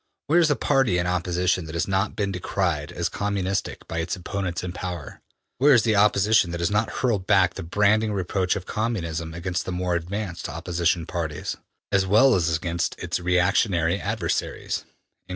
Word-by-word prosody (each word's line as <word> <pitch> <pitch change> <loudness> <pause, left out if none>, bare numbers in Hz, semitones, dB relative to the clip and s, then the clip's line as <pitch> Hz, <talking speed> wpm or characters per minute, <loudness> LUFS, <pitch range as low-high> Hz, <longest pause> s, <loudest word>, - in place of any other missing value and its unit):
Where 165 +4 +4
is 170 - +5
the 145 - +2
party 135 -12 +2
in 85 - 0
opposition 90 0 0
that 80 +1 -7
has 85 - 0
not 95 +2 0
been 100 -2 -1
decried 90 -4 -2
as - - -1
communistic 100 -1 -2
by 85 - -3
its 85 +1 -2
opponents 90 -1 -4
in 90 - -4
power? 90 -5 -6 0.4
Where 140 -1 +6
the 110 -1 +2
Opposition 105 -1 +4
that 85 0 -4
has 85 +1 0
not 105 +2 +1
hurled 105 -8 -1
back 95 -4 +4
the - - -6
branding 105 +5 +2
reproach 95 -1 0
of 95 - -5
Communism 85 -8 -3
against 90 +1 -2
the - - -5
more 90 0 -1
advanced 90 +2 -3
opposition 85 +1 -1
parties, 80 -4 -4 0.4
as 95 -1 +2
well 110 +7 +6
as 85 -4 +2
against 85 +1 -2
its 90 0 -3
re 90 0 0
actionary 90 -1 +2
adversaries?'' 105 +3 -2
90 Hz, 175 wpm, -24 LUFS, 85-105 Hz, 0.4 s, Where